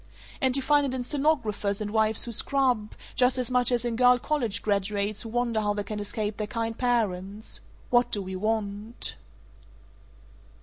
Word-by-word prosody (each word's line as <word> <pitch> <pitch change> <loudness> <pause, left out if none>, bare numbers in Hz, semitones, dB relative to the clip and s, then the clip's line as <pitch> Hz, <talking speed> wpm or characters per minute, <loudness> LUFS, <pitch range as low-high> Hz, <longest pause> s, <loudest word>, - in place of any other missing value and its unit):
And 260 -2 +3
you 270 - -2
find 290 +1 +3
it 265 -2 -2
in 250 - -3
stenographers 245 -8 0
and 210 -1 -4
wives 220 0 +6
who 240 - -4
scrub, 250 -3 +1 0.2
just 250 0 +3
as 255 -1 -1
much 250 -1 +3
as 245 -1 0
in 235 -1 -1
girl 250 +1 +5
college 245 -6 -2
graduates 205 0 -1
who 230 - -6
wonder 235 -1 0
how 205 -1 0
they 205 - -2
can 210 +1 -5
escape 210 0 -4
their 210 - -3
kind 225 +1 -3
parents. 215 -4 -2 0.3
What 245 0 +4
do 205 - 0
we 190 0 -6
want?" 215 +2 -3
225 Hz, 175 wpm, -26 LUFS, 210-250 Hz, 0.3 s, wives